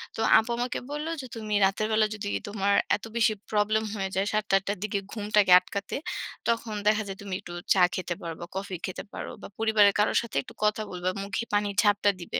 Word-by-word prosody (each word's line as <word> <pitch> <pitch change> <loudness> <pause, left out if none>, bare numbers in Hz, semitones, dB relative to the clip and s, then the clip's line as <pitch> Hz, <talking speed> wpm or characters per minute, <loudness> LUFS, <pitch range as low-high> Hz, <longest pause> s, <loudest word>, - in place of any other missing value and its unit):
তো - - -7 0.2
আপু 225 - +1
আমাকে 245 +1 -2
বলল 300 +2 -3
যে 260 - -8
তুমি 215 -2 -4
রাতের 195 +3 0
বেলা 215 0 +4
যদি 205 -1 -5 0.2
তোমার 200 -1 0 0.2
এত 215 - -8
বেশি 225 -2 +3 0.2
প্রবলেম 215 +1 +2
হয়ে 195 -2 -2
যায় 190 +1 +1
৭ঃ০০ 215 0 +2
টা - - +6
৮ঃ০০ - - -22
টার 200 - -1
দিকে 205 -1 -1
ঘুমটাকে 210 -3 +2
আটকাতে 200 +1 -5 0.5
তখন 230 -2 -1
দেখা 215 0 +3
যায় 195 0 -6
তুমি 200 -2 -6
একটু 175 -3 -10 0.2
চা 190 - +3
খেতে 180 -1 -2
পারবা 165 -1 -6
বা - - -7
কফি 195 -1 -4
খেতে 185 - -5
পারো - - -6
বা - - -7
পরিবারের 215 -2 +4
কারো 210 - +3
সাথে 235 -2 -9
একটু - - -13
কথা 210 +1 +2
বলবে। 180 0 -2
মুখে 200 +3 -2
পানির 205 -1 +1
ঝাপটা 205 0 +4
দিবে।" 170 - -3
205 Hz, 220 wpm, -27 LUFS, 195-215 Hz, 0.5 s, টা